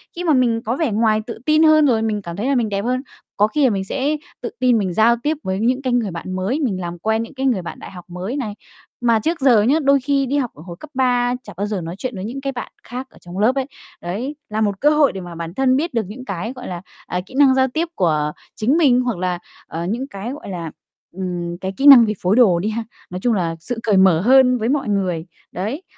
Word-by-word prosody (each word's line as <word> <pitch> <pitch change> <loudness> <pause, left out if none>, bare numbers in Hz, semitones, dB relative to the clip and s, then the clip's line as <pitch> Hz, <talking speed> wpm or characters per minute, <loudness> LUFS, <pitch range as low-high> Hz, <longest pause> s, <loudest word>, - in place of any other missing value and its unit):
Khi 350 - -4
mà 325 -3 +3
mình 240 -4 +2
có 235 +3 0
vẻ 295 -4 0
ngoài 215 0 +2
tự 230 - -6
tin 310 +1 +4
hơn, 310 -1 +6
rồi 235 -5 +3
mình 215 -2 -1
cảm 170 -3 -7
thấy 210 +7 -2
là 275 - +2
mình 235 -4 +1
đẹp 200 -1 -1
hơn, 255 +1 0 0.4
có 210 - +4
khi 295 +7 0
là 260 - +5
mình 195 -3 -1
sẽ 275 +9 -1 0.2
tự 240 - -3
tin 250 -2 +4
mình 190 -4 -1
giao 225 +5 +4
tiếp 305 +1 0
với 190 0 -2
những 250 +4 +1
cái 255 -2 -1
người 230 -5 +1
bạn 175 +2 -6
mới, 195 +10 -1
mình 215 -11 -1
làm 175 0 -5
quen 220 +4 0
những 230 - -10
cái 265 0 -3
người 240 -8 +2
bạn 170 - -8
đại - - -10
học 180 -2 -11
mới 185 +9 -4
này. 225 -7 -3 0.5
Mà 230 -2 +3
trước 330 +10 -1
giờ 245 -6 +5
nhá, 250 +8 +3
đôi 275 0 +4
khi 275 +1 +1
đi 275 +3 -1
học 255 -5 -1
ở 150 - -13
hồi 175 -2 -8
cấp 305 - -11
3 245 -2 +2
chẳng 205 - -10
bao 200 - -1
giờ 205 -3 -3
nói 165 +1 -6
chuyện 250 +1 -4
với 190 0 -5
những 255 +5 -5
cái 275 0 -2
bạn 245 -2 -7
khác 255 +2 -6
ở - - -20
trong 175 +1 -9
lớp 230 +6 +3
ấy. 270 -1 0 0.4
Đấy 220 +12 -4
là 215 +1 -2
một 200 -2 0
cơ 295 - +5
hội 300 -2 +4
để 190 - -6
mà 175 -1 -9
bản 165 0 -6
thân 260 +3 +2
biết 320 +4 -1
được 230 -3 0
những 245 +6 -9
cái, 200 +4 -4
gọi 250 -1 -9
là, 175 -2 -5 0.3
à, 180 - -2
kỹ 205 - -16
năng 275 -2 +6
giao 265 0 +3
tiếp 320 +7 -2
của 150 -4 +1 0.2
chính 255 +9 +2
mình, 260 -7 +4
hoặc 245 -6 -2
là, 180 0 -2 0.3
ờ, 165 +1 -4
những 235 +8 -2
cái, 200 +1 -6
gọi 290 - -9
là, 170 -4 -5 0.5
ừm, 175 -2 -4
cái 190 0 -3
kỹ 275 - -1
năng 260 -5 +10
về 215 - -1
phối 185 +3 +2
đồ 205 -9 +5
đi 205 +5 -1
ha, 225 +1 -3 0.3
nói 180 - -5
chung 245 - +3
là 170 -5 -1
sự 230 +8 -4
cởi 210 -3 +2
mở 190 -4 +5
hơn 250 +3 +5
với 225 0 -1
mọi 275 -4 0
người, 185 -5 -1 0.3
đấy. 220 - -4
225 Hz, 275 wpm, -20 LUFS, 190-265 Hz, 0.5 s, năng